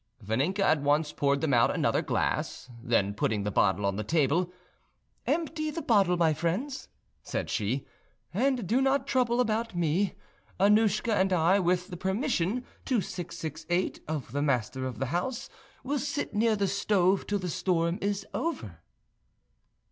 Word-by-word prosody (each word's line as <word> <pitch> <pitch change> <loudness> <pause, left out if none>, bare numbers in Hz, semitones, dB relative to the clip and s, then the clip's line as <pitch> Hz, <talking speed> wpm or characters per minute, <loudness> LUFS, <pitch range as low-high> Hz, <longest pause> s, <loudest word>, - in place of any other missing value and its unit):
Vaninka 140 - -1
at 155 -5 +3
once 150 +2 +1
poured 140 -1 +1
them 155 -4 +1
out 115 -2 +5
another - - +1
glass; 125 - -2
then 115 -5 +1
putting 105 0 0
the 105 - -2
bottle 100 +1 +2
on 100 0 0
the 105 - -2
table, 160 - +1 0.8
"Empty 315 -2 -1
the 320 +1 -5
bottle, 195 -8 +3
my 165 -2 +3
friends," 185 - -2 0.3
said - - -4
she, 120 +6 -1 0.5
"and 250 +2 +1
do 235 +9 +2
not 270 +1 +2
trouble 245 -2 +1
about 225 -3 0
me. 175 +3 +1 0.4
Annouschka 210 +2 +3
and 190 -1 +2
I, 180 +2 +4
with 180 0 +1
the 175 - -6
permission 205 - -1 0.2
2668 175 - -2
of 150 -6 -4
the 145 +3 -1
master 130 -2 0
of 125 -4 -6
the 135 - -1
house, 235 +8 -2 0.3
will 285 +2 -1
sit 290 +3 -3
near 220 +1 +3
the 200 -1 0
stove 195 -1 +2
till 205 - 0
the 185 -2 -4
storm 175 0 0
is 200 0 -1
over." 110 - -3
180 Hz, 155 wpm, -28 LUFS, 145-220 Hz, 0.8 s, out